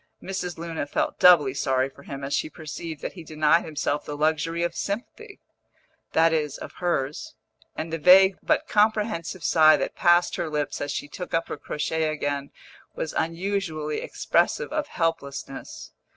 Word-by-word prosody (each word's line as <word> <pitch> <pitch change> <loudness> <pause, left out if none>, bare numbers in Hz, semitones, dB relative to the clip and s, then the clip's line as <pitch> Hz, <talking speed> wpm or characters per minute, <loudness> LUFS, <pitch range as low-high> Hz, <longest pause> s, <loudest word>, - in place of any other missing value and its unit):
Mrs. 185 -2 -4
Luna 165 -3 -4
felt - - -2
doubly 155 -7 +7
sorry 130 -1 +1
for 135 +1 -16
him 140 0 -8
as 140 +1 -3
she - - 0
perceived 155 -1 -7
that - - -4
he 175 - -10
denied 155 +1 +2
himself 150 -1 -2
the 145 - -6
luxury 160 +2 0
of 175 - -1
sympathy 390 - -5 0.7
(that 165 0 +4
is, 150 -3 -1
of - - -9
hers), 150 -5 -2 0.4
and 160 +1 -5
the 165 - -2
vague 190 +4 +7
but - - +1
comprehensive 210 -5 +1
sigh 155 -1 +6
that - - -3
passed 175 0 +3
her 170 -2 -2
lips 150 -1 -2
as 145 - -2
she 145 - -4
took 180 +4 -5
up 165 - -1
her - - -4
crochet 155 +2 -2
again 145 -2 -2 0.5
was 155 - -4
unusually 165 -3 -2
expressive 475 -9 0
of 305 -1 -1
helplessness. 140 - -4
160 Hz, 165 wpm, -25 LUFS, 150-175 Hz, 0.7 s, doubly